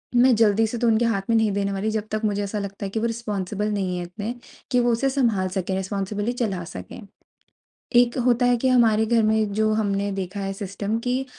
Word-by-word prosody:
मैं 245 0 +6
जल्दी 220 0 +3
से 235 - -4
तो 235 - +1
उनके 225 +1 +3
हाथ 200 -4 +1
में 230 - +3
नहीं 220 -2 +3
देने 200 0 -1
वाली 195 +3 -1
जब 215 0 -3
तक 215 0 -1
मुझे 205 -1 0
ऐसा 205 +1 -3
लगता 200 0 -5
है - - -3
कि 220 - -2
वो 230 - -1
रिस्पोंसिबल 210 -3 -3
नहीं 190 -3 -1
है 175 - -3
इतने 205 +7 -5 0.4
कि 250 - +3
वो 240 0 +2
उसे 255 +4 +1
संभाल 230 -9 +1
सकें, 190 0 -2
रिस्पोंसिबली 200 +3 -2
चला 200 -8 -2
सकें। 90 - -9 1.0
एक 240 0 +4
होता 245 0 +3
है 245 0 +4
कि 260 +3 0
हमारे 225 -3 +4
घर 230 0 +3
में 215 -1 +1
जो 215 +1 +1
हमने 200 -2 0
देखा 195 +1 -4
है 195 0 -2
सिस्टम 200 +2 -3
की 255 +2 0
215 Hz, 225 wpm, -23 LUFS, 200-230 Hz, 1.0 s, मैं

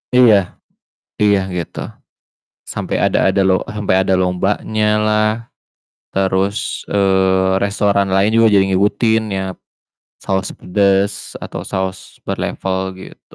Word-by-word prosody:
Iya. 120 -4 +7 0.9
Iya 100 -1 +4 0.2
gitu. 85 - -5 0.9
Sampe - - -4
ada - - +2
ada 100 - +1
lo - - +4 0.2
sampe 105 -3 -1
ada 95 0 +2
lombanya 100 +4 -1 0.2
lah, 110 0 +2 0.9
terus, 95 +1 -1
eee, 95 -1 +2
restoran 100 -1 +1
lain 100 +2 +3
juga 115 0 +5
jadi 95 - +5
ngikutin 110 +4 +2 0.2
ya, 95 - -1 0.8
saus 95 0 -1
pedas 100 +1 0
atau - - -6
saus 95 -1 -2 0.3
per - - -3
level 95 -1 -2 0.2
gitu. - - -14
100 Hz, 115 wpm, -17 LUFS, 95-105 Hz, 0.9 s, Iya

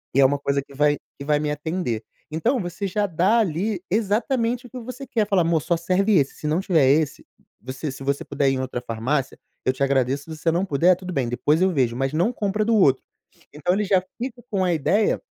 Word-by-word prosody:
e - - +4
é - - +7
uma 140 +2 +2
coisa 140 0 0
que 140 - -17
vai, 145 +1 +2 0.2
que 140 - -6
vai 150 0 +3
me 150 0 -1
atender." 150 -6 -3 0.3
Então, 230 - +1
você 175 +2 -4
já 205 +2 0
dá 190 +6 +2
ali 190 0 -1
exatamente 230 +4 0
o - - -19
que 255 - -7
você 255 +3 -8
quer. 220 -3 0
Fala: 195 -3 +3
"Amor, 165 -1 +1
só 170 - 0
serve 190 +5 +2
esse, 140 -3 +1
se 150 - -5
não 155 +3 +1
tiver 165 -8 +3
esse, 150 +2 +1 0.4
você 130 +4 -5
se 135 +1 -9
você 140 +1 -1
puder 140 -1 +1
ir - - +1
em - - -3
outra 130 -1 -4
farmácia 125 +4 -2 0.3
eu 130 - +2
te 135 - -2
agradeço, 135 0 +1
se 160 - -6
você 165 - +1
não 175 +4 0
puder 180 +2 +3
tudo 180 0 -7
bem, 135 -5 0
depois 145 +7 +1
eu 190 - +4
vejo, 125 -7 +1
mas 135 +2 -1
não 175 +9 +2
compra 210 -1 -1
do 230 - +2
outro." 140 -11 +4 0.5
Então 155 +5 0
ele 210 - 0
já 190 -2 +3 0.2
fica 250 -1 -5
com 195 -2 +1
a 180 - +2
ideia 190 +7 +1
165 Hz, 240 wpm, -23 LUFS, 140-200 Hz, 0.5 s, é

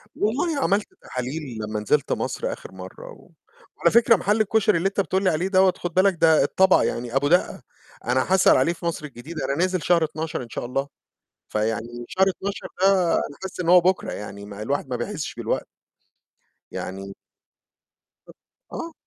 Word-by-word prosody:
والله 280 +9 0
عملت 200 +1 +1 0.2
تحاليل 125 0 -5
لما 105 0 -3
نزلت 140 +7 0
مصر - - -3
آخر - - -11
مرّة 95 0 -10
و - - -16 0.5
وعلى 170 - +3
فكرة 230 +1 +6
محل 205 +3 +1
الكشري 215 -2 +2
اللي 170 +3 +1
أنت 195 +1 -3
بتقول 190 +2 -1
لي 185 - +4
عليه 170 +2 0
دوّة 190 -1 +4
خد 175 -1 -5
بالك 190 +2 +4
ده 160 -3 +5
الطبق 190 +6 +4
يعني 120 +1 -3
أبو 140 +1 +2
دقّة. 180 +4 +2 0.4
أنا 130 +9 +1
هاسأل 190 0 +6
عليه 170 - +2
في 170 - -10
مصر 165 -2 -2
الجديدة، 145 +2 -7
أنا 140 - -1
نازل 185 +1 0
شهر 170 +1 +3
12 160 -1 -3
إن 120 - -12
شاء - - -5
الله. 135 +3 -2 0.6
فيعني 115 +3 -3
شهر 190 +1 +2
12 195 +1 -4
ده، 190 -3 +4
أنا 145 - -2
حاسس 190 -1 -6
إن 170 - -2
هو 180 +1 +8
بكرة 185 +1 0
يعني، 100 -1 -7
ما 100 0 -8
الواحد 140 +3 -2
ما 125 - -2
بيحسش 120 +5 -4
بالوقت. - - -2 1.1
يعني 95 +1 -6 1.6
أ - - -7
آه. 335 - -5
165 Hz, 180 wpm, -23 LUFS, 125-190 Hz, 1.6 s, هو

